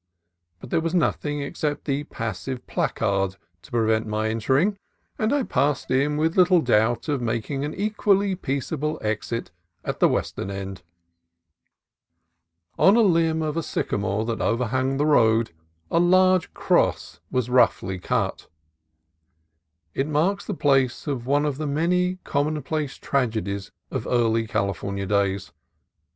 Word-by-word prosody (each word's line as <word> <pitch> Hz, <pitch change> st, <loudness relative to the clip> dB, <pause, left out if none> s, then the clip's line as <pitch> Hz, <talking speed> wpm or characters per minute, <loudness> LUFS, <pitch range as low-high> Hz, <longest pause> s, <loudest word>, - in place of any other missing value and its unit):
But -, -, -11 dB
there -, -, +2 dB
was 165 Hz, +2 st, -1 dB
nothing 145 Hz, -3 st, 0 dB
except 145 Hz, +1 st, -3 dB
the 145 Hz, 0 st, -1 dB
passive 115 Hz, +3 st, -5 dB
placard 95 Hz, -1 st, 0 dB, 0.3 s
to -, -, -16 dB
prevent 110 Hz, -2 st, +1 dB
my 110 Hz, +1 st, -1 dB
entering, 135 Hz, -, +1 dB, 0.4 s
and 215 Hz, 0 st, +1 dB
I 285 Hz, -2 st, +2 dB
passed 140 Hz, -, 0 dB
in 140 Hz, +3 st, +2 dB
with 160 Hz, +2 st, +1 dB
little 180 Hz, -1 st, +5 dB
doubt 120 Hz, -3 st, +2 dB
of 145 Hz, -4 st, 0 dB
making 120 Hz, +4 st, -2 dB
an 150 Hz, -, -4 dB
equally 200 Hz, -1 st, +1 dB
peaceable 150 Hz, -1 st, -2 dB
exit 110 Hz, +2 st, -3 dB, 0.3 s
at -, -, -3 dB
the -, -, +5 dB
western 95 Hz, -, -2 dB
end. 95 Hz, -1 st, -6 dB, 2.0 s
On 195 Hz, -, +6 dB
a 235 Hz, -, +5 dB
limb 165 Hz, -5 st, +2 dB
of 155 Hz, -1 st, -2 dB
a 165 Hz, -, 0 dB
sycamore 105 Hz, -7 st, -2 dB
that 115 Hz, -1 st, -3 dB
overhung 130 Hz, +3 st, 0 dB
the 145 Hz, -, +1 dB
road 115 Hz, -, +3 dB, 0.4 s
a 165 Hz, -, +3 dB
large 185 Hz, 0 st, +4 dB
cross -, -, +1 dB
was 125 Hz, -1 st, -1 dB
roughly 95 Hz, -7 st, +2 dB
cut. -, -, -2 dB, 1.5 s
It 135 Hz, -, -1 dB
marks 170 Hz, +7 st, 0 dB
the -, -, -3 dB
place 135 Hz, -5 st, +2 dB
of 130 Hz, -5 st, -3 dB
one 145 Hz, +2 st, +2 dB
of 145 Hz, -1 st, -2 dB
the 155 Hz, -, -2 dB
many 180 Hz, +5 st, +1 dB
commonplace 150 Hz, 0 st, -1 dB
tragedies 110 Hz, -7 st, -2 dB, 0.2 s
of -, -, -3 dB
early 115 Hz, -2 st, +2 dB
California 100 Hz, 0 st, -2 dB
days. 100 Hz, -4 st, 0 dB
135 Hz, 140 wpm, -24 LUFS, 110-160 Hz, 2.0 s, On